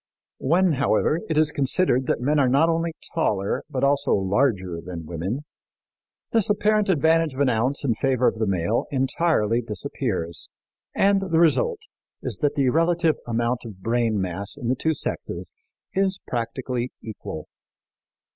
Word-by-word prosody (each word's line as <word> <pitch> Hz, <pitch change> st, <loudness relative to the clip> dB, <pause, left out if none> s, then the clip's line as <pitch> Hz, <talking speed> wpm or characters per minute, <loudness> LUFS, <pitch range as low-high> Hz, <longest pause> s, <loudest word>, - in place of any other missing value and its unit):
When, 175 Hz, +6 st, +3 dB
however, 145 Hz, +2 st, +2 dB
it 160 Hz, -, 0 dB
is 155 Hz, -1 st, +3 dB
considered 135 Hz, -2 st, +1 dB
that -, -, +1 dB
men 145 Hz, +4 st, +2 dB
are 130 Hz, -3 st, +4 dB
not 140 Hz, +6 st, +4 dB
only 165 Hz, 0 st, 0 dB, 0.2 s
taller 100 Hz, -, 0 dB
but 135 Hz, -3 st, -2 dB
also 140 Hz, 0 st, +3 dB
larger 95 Hz, -4 st, 0 dB
than 85 Hz, -3 st, -7 dB
women, 90 Hz, -, -3 dB, 0.9 s
this 225 Hz, -3 st, +2 dB
apparent 210 Hz, 0 st, +2 dB
advantage 160 Hz, -2 st, +3 dB
of -, -, -7 dB
an 140 Hz, -2 st, +3 dB
ounce 125 Hz, +5 st, 0 dB
in 120 Hz, -, +3 dB
favor 130 Hz, +1 st, +1 dB
of 110 Hz, -, 0 dB
the 110 Hz, -, +1 dB
male 95 Hz, +4 st, 0 dB
entirely 130 Hz, -4 st, +1 dB
disappears, 105 Hz, -, -3 dB, 0.5 s
and 200 Hz, 0 st, +3 dB
the 165 Hz, -, +2 dB
result 400 Hz, -, +3 dB, 0.4 s
is -, -, -3 dB
that 145 Hz, -2 st, +1 dB
the 135 Hz, -3 st, +3 dB
relative 165 Hz, +1 st, +2 dB
amount 120 Hz, +1 st, 0 dB
of 100 Hz, -6 st, -10 dB
brain 115 Hz, -2 st, +1 dB
mass 95 Hz, +1 st, -3 dB
in 120 Hz, -, -3 dB
the 130 Hz, -, +2 dB
two 160 Hz, +4 st, 0 dB
sexes -, -, -4 dB, 0.4 s
is 190 Hz, 0 st, +1 dB
practically 125 Hz, +1 st, -3 dB
equal. 110 Hz, -1 st, -7 dB
130 Hz, 155 wpm, -24 LUFS, 110-160 Hz, 0.9 s, are